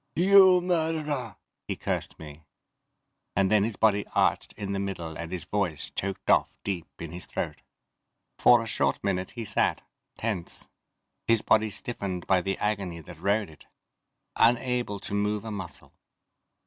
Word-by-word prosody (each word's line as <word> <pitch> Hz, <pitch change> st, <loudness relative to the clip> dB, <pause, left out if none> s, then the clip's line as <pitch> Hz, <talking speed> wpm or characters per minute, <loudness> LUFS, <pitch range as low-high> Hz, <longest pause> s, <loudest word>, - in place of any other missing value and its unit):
"You 190 Hz, 0 st, +7 dB
murderer!" 160 Hz, -, -1 dB, 0.3 s
he -, -, -2 dB
cursed -, -, -3 dB
me, 75 Hz, 0 st, -11 dB, 0.9 s
and 95 Hz, -1 st, +2 dB
then 105 Hz, -2 st, +5 dB
his 110 Hz, 0 st, -2 dB
body 105 Hz, -1 st, +3 dB
arched -, -, +2 dB
in 100 Hz, -1 st, -4 dB
the 100 Hz, -, -1 dB
middle 85 Hz, -5 st, -4 dB
and 85 Hz, +1 st, -6 dB
his 90 Hz, -4 st, -4 dB
voice 95 Hz, -7 st, -2 dB
choked 95 Hz, 0 st, -4 dB
off -, -, +3 dB
deep 95 Hz, -5 st, -3 dB
in 85 Hz, -2 st, -6 dB
his 90 Hz, 0 st, -4 dB
throat. -, -, -4 dB, 0.8 s
For 120 Hz, -1 st, +6 dB
a -, -, -7 dB
short 70 Hz, -10 st, 0 dB
minute 95 Hz, -2 st, -1 dB
he 115 Hz, -, -3 dB
sat, 105 Hz, -, +1 dB, 0.3 s
tense, 105 Hz, -7 st, -3 dB, 0.6 s
his 115 Hz, -2 st, +4 dB
body 110 Hz, 0 st, +3 dB
stiffened 100 Hz, -4 st, -4 dB
by 95 Hz, -2 st, +3 dB
the 95 Hz, +2 st, -2 dB
agony 100 Hz, -5 st, -2 dB
that 80 Hz, +1 st, -12 dB
rode 100 Hz, -1 st, +1 dB
it 75 Hz, -, -18 dB, 0.7 s
unable 120 Hz, -2 st, +2 dB
to -, -, -6 dB
move 105 Hz, +1 st, 0 dB
a 110 Hz, -, -4 dB
muscle. 95 Hz, -4 st, -7 dB
100 Hz, 155 wpm, -27 LUFS, 90-115 Hz, 0.9 s, You